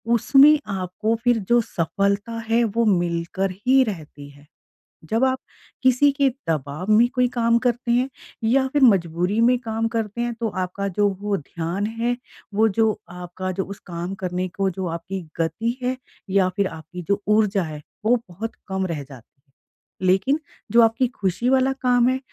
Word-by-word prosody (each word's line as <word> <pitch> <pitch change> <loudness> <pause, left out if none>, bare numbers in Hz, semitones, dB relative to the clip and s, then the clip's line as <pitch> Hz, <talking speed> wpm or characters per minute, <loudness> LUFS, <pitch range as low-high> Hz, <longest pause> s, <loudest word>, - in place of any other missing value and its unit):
उसमें 285 +6 +6
आपको 190 +4 -1
फिर 245 -2 +3
जो 240 0 +5
सफलता 200 +5 -1
है 235 +1 +3
वो 230 +1 +1
मिलकर 175 0 0 0.2
ही 265 0 +6
रहती 155 - -7
है। 145 +1 -18 0.7
जब 230 +4 +3
आप 260 0 +1 0.4
किसी 260 +3 +5
के 275 -1 +2 0.2
दबाव 155 +5 -2
में 230 +3 +6
कोई 250 0 +3
काम 230 0 +3
करते 240 0 -1
हैं 250 +3 +2 0.3
या 265 +4 +3
फिर 290 - +2
मजबूरी 180 -2 +3
में 245 +2 +4
काम 225 -1 -2
करते 220 +1 -3
हैं 240 0 -1
तो 225 - 0
आपका 200 +2 -4
जो 205 0 +4
वो 205 -1 0
ध्यान 170 +6 -4
है 240 +1 0 0.4
वो 220 +2 +4
जो 220 -1 +5 0.2
आपका 180 +1 -5
जो 190 +1 -2
उस 200 0 -9
काम 175 +2 -4
करने 180 +1 -1
को 195 -1 +1
जो 185 0 -4
आपकी 190 +2 -6 0.2
गति 225 +9 -1
है 255 +1 0 0.3
या 190 -1 +3
फिर 200 -1 +2
आपकी 160 +2 -9
जो 200 0 +1
ऊर्जा 210 -2 +3
है 155 -2 -7 0.2
वो 245 +2 +4
बहुत 220 +6 -6
कम 190 0 -1
रह 155 -4 -4
जाती 130 -4 -13
है। - - -62 0.7
लेकिन 235 +11 +3 0.3
जो 235 0 +6
आपकी 230 +3 +3
खुशी 210 +1 -1
वाला 265 0 +3
काम 245 -1 +3
है 260 0 0
205 Hz, 175 wpm, -23 LUFS, 180-240 Hz, 0.7 s, उसमें